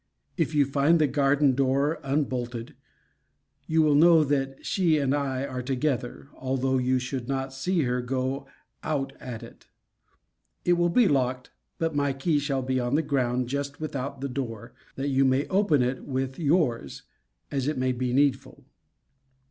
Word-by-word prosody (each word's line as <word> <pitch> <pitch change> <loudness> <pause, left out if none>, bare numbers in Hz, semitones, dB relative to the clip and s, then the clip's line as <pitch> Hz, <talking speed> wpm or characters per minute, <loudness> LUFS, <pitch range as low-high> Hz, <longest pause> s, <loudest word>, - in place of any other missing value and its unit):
If 165 -3 -1
you 145 -1 +4
find 140 +4 +3
the 155 - +3
garden 140 0 +3
door 140 +4 +1
unbolted, 125 -4 -2 0.9
you 160 0 +3
will 150 -1 +4
know 160 +2 +6
that 135 -2 -2
she 170 -5 +2
and 140 -2 +1
I 140 -2 -1
are 130 -2 -4
together, 130 0 -2
although 130 0 -1
you 130 +1 +1
should 125 -1 -4
not 135 0 -2
see 165 +5 0
her 125 -1 0
go 130 +2 -2 0.3
out 135 -3 -2
at 120 -3 -7
it. - - -14 1.0
It 175 - +4
will 175 0 +2
be 230 +5 +4
locked, 130 -4 0 0.3
but 165 -1 -1
my 145 -1 +1
key 145 +3 +1
shall 140 -2 -1
be 130 0 0
on 120 +2 0
the 160 - +2
ground 125 -3 0
just 140 +2 -4
without 140 -3 -4
the 140 - -2
door, 125 -5 -5 0.2
that 135 +1 -2
you 135 0 +3
may 130 +1 +2
open 190 -9 +3
it 125 +1 -2
with 130 0 -3
your's, 145 - 0 0.5
as 135 -1 -1
it 150 -2 -1
may 130 0 +1
be 125 0 -2
needful. 140 +1 0
135 Hz, 165 wpm, -26 LUFS, 130-145 Hz, 1.0 s, know